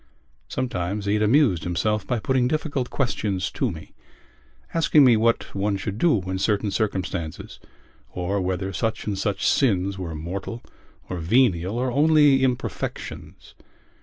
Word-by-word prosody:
Sometimes 100 -5 -3
he 100 - +1
had 105 - +1
amused 110 - +3
himself 95 +4 -1
by 125 - 0
putting 125 +2 +1
difficult 145 -3 -2
questions 105 -8 -1
to - - -1
me, - - -9 0.8
asking 155 -3 +5
me 120 -2 +6
what 115 +1 +1
one 100 0 0
should 100 +2 -5
do 155 -9 +3
in 95 +1 -3
certain 105 0 0
circumstances 95 -6 -3 0.5
or 95 +3 -2
whether 95 +1 -2
such 110 +3 -2
and 105 - -2
such 100 0 -1
sins 100 -6 +1
were 85 -3 -5
mortal 95 +8 -5 0.4
or 90 - -4
venial 95 +1 +2
or 125 +1 0
only 145 -1 +5
imperfections. 125 -2 -4
105 Hz, 140 wpm, -24 LUFS, 95-125 Hz, 0.8 s, me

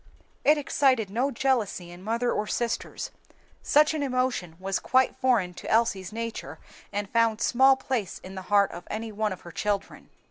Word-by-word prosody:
It 300 +2 +5
excited 260 -7 +2
no 250 +6 +1
jealousy 230 -9 -1
in 175 +1 -11
mother 230 +4 0
or 210 - -1
sisters. 235 +1 -3 0.5
Such 300 +2 +4
an 310 - -2
emotion 255 - -1
was 195 0 -1
quite 260 0 +2
foreign 230 -9 +1
to - - -8
Elsie's 200 -5 +1
nature 230 +1 -5 0.3
and 205 0 -2
found 230 0 +2
small 265 +3 +5
place 255 -7 -3
in 185 - -9
the 190 - -6
heart 200 -1 +4
of 175 +1 -9
any 220 +1 -4
one 215 0 -1
of 185 - -6
her 175 - -10
children. 200 +2 -3
225 Hz, 175 wpm, -27 LUFS, 195-255 Hz, 0.5 s, It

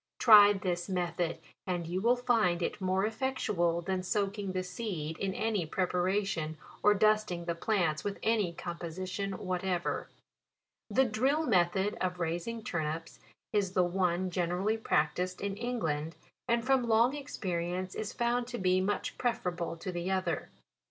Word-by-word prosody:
Try 205 -3 +9
this 180 -2 -2
method, 175 -2 -1 0.3
and 175 -2 -1
you 180 +3 -2
will 235 +3 +4
find 225 -8 +2
it 200 - -3
more 190 +1 +1
effectual 210 -8 0
than 185 +1 -1
soaking 200 0 -1
the 185 0 -1
seed 180 -6 -4
in 195 -1 -2
any 215 -5 0
pre 185 +4 0
paration, 180 -3 0 0.3
or 210 0 +5
dusting 215 -5 +2
the 170 - 0
plants 170 -4 0
with 205 -1 -3
any 215 -5 +2
com 170 0 -6
position 185 +3 -4
whatever. 185 -1 -2 0.8
The 265 - +4
drill 265 +8 +1
method 190 - +2
of 180 -1 -1
raising 175 +7 -2
turnips 160 -2 -3 0.3
is 200 -3 +1
the 185 - +4
one 180 0 0
generally 180 +4 0
practised 180 0 0
in 200 -1 -2
England, 165 -10 -2 0.3
and 235 0 +1
from 260 -2 +3
long 230 +5 +4
experience 185 -9 -3
is 215 0 -4
found 240 0 0
to 245 -1 -5
be 185 -2 +2
much 205 +2 -2
prefer 235 -7 0
able 170 -1 -4
to 185 - -5
the 175 +1 -3
other. 190 -1 -1
185 Hz, 155 wpm, -31 LUFS, 175-215 Hz, 0.8 s, Try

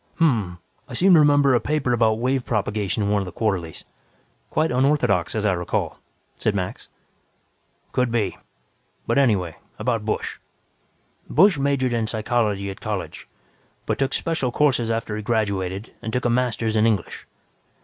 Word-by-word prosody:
"Hm 165 - +4
m 120 -7 +2
m. 85 - -16 0.3
I - - -8
seem 190 +1 +5
to 165 - +8
remember 145 -2 +5
a 120 - +4
paper 150 -4 0
about 110 -2 +3
wave 130 +2 0
propagation 105 -2 -1
in 100 - 0
one 105 -1 +2
of 95 - -5
the - - -6
quarterlies. 90 -5 -2 0.6
Quite 160 +1 +1
unorthodox, 125 - +2
as 110 -1 -1
I 100 - +3
recall," 90 -1 -2 0.4
said 105 - 0
Max. 95 -2 -4 1.0
"Could 125 -2 0
be. 110 -6 0 0.7
But - - +2
anyway, 100 - +1 0.2
about - - -1
Busch. - - -3 0.9
"Busch 180 -1 +5
majored 135 -3 +1
in 115 -2 0
psychology 110 -3 0
at 95 - -11
college, - - -5 0.6
but - - -2
took 135 0 0
special 155 -7 -1
courses 125 -5 +2
after 115 -2 -2
he 105 - -4
graduated 100 -3 -2
and 110 - -4
took 125 +2 -2
a 120 - +3
Master's 120 -2 0
in 110 +1 +4
English. 105 -6 -2
115 Hz, 165 wpm, -23 LUFS, 100-130 Hz, 1.0 s, to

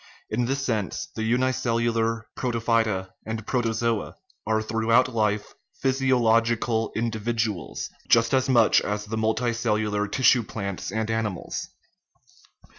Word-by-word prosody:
In 120 +3 +1
this 135 +2 -1
sense 110 -6 -2
the - - -3
unicellular 115 -1 +1
protophyta 115 -5 0
and 110 -1 -5
protozoa 115 -2 -1 0.3
are 110 0 +2
throughout 115 +3 +2
life 105 -2 0 0.3
physiological 115 -4 +2
individuals, 110 -5 -2 0.2
just 115 +1 +4
as 130 0 +2
much 120 -4 +5
as 105 0 -3
the 110 +2 -4
multicellular 110 -2 0
tissue 130 -1 +4
plants 100 -4 -5
and 110 +1 -1
animals. 110 -5 -3
115 Hz, 110 wpm, -25 LUFS, 110-120 Hz, 0.3 s, much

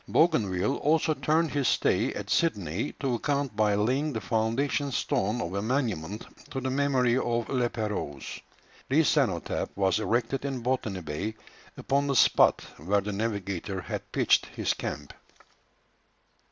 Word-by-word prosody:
Bougainville 105 - +2
also 155 +1 +2
turned 160 +1 +1
his 140 -3 0
stay - - +2
at - - -5
Sydney 105 - 0
to 135 -3 -2
account 140 +2 -1
by 105 -1 +3
laying 130 +9 +1
the 110 - -2
foundation 115 +7 0
stone 120 -4 0
of 85 -4 -3
a 100 - -1
monument 110 - -2 0.2
to 135 - -3
the 130 0 -2
memory 130 -3 +2
of 120 -2 -1
La 125 -3 +1
Pérouse. 105 - -4 0.5
This 150 +3 +4
cenotaph 120 - 0
was 95 0 +2
erected 120 +4 0
in 135 -3 -3
Botany 115 -7 -1
Bay, 85 +8 -4 0.4
upon 140 +1 0
the 140 - 0
spot - - +5
where 100 +7 +1
the 105 +1 -4
navigator 100 -3 -3
had - - -6
pitched - - +3
his - - -1
camp. - - -6
120 Hz, 145 wpm, -28 LUFS, 100-140 Hz, 0.5 s, spot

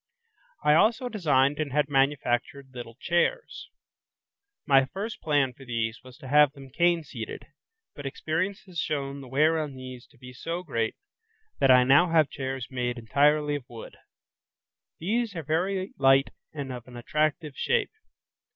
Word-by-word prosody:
I 150 - +5
also 225 +9 +3
designed 145 - +2
and 150 -3 -2
had 150 +1 +1
manufactured 135 -1 0
little 120 -2 -8
chairs. 325 - -1 1.0
My 135 -2 +5
first 200 +9 -6
plan 145 -5 +1
for 135 - -15
these 115 -2 -3
was 130 -1 -14
to 130 - -11
have 145 +1 +5
them 135 -2 -13
cane 170 +2 +2
seated, 145 - -7 0.5
but 145 -1 -7
experience 165 +8 -2
has 180 -4 -6
shown 140 -2 -3
the 135 - -10
wear 155 +5 +2
on 150 -3 -4
these 130 -1 -9
to - - -25
be 125 +1 -12
so 165 +7 -5
great, 115 -9 -2 0.6
that 135 - +3
I 125 -1 +7
now 145 +7 +5
have 160 -3 +3
chairs 130 -2 -4
made 125 -1 -2
entirely 145 +6 +2
of 140 -4 -6
wood. 115 -2 -10 1.0
These 220 +4 -1
are 165 - -4
very 185 +6 -1
light 135 0 +4 0.2
and 140 -4 -5
of 125 -1 -9
an 125 -1 -11
attractive 150 +3 -1
shape. 475 0 0
145 Hz, 160 wpm, -27 LUFS, 130-165 Hz, 1.0 s, I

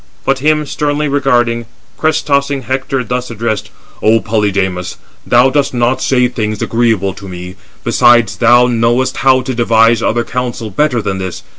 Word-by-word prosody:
But 135 0 +1
him 150 +2 +1
sternly 150 +1 -1
regarding, 120 -5 0 0.3
crest 155 -1 0
tossing 140 -1 0
Hector 130 +1 -2
thus 125 +1 -3
addressed: 110 -2 -3 0.3
"O 110 +1 +3
Polydamas, 100 -5 -2 0.3
thou 125 +2 +4
dost 140 -2 0
not 120 +2 0
say 125 -2 +2
things 110 -3 -3
agreeable 115 -5 0
to 95 +1 -11
me: 90 0 -8 0.3
besides, 120 -5 +3
thou 120 +4 +5
knowest 120 +2 0
how 130 -1 +3
to 130 +1 -4
devise 115 -1 +3
other 120 +1 0
counsel 120 -3 -4
better 125 0 0
than 95 0 -3
this. 95 -2 -6
120 Hz, 155 wpm, -13 LUFS, 110-130 Hz, 0.3 s, thou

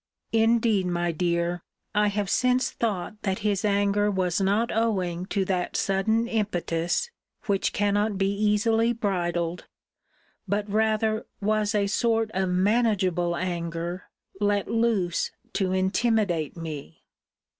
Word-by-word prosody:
Indeed, 225 -3 +3
my 175 -1 0
dear, 170 +1 -1 0.3
I 210 0 +3
have 205 0 -1
since 250 +5 +2
thought 210 -1 -3
that 190 -2 -1
his 200 -2 +1
anger 205 0 +2
was 185 -2 0
not 205 +4 +1
owing 185 -6 0
to 195 -2 0
that 180 -2 -1
sudden 220 +4 +1
impetus, 180 - -1 0.3
which 200 -4 +1
cannot 205 0 +1
be 195 0 +1
easily 215 +3 +2
bridled; 175 -6 -2 0.8
but 205 +1 -1
rather 220 +1 +1
was 215 0 0
a 205 -1 +2
sort 225 +1 +1
of 190 -1 0
manageable 185 -3 +2
anger 170 0 -3 0.3
let 205 -1 +1
loose 225 -7 +1 0.2
to 190 -2 0
intimidate 190 - +1
me. 150 - -7
200 Hz, 120 wpm, -26 LUFS, 180-215 Hz, 0.8 s, Indeed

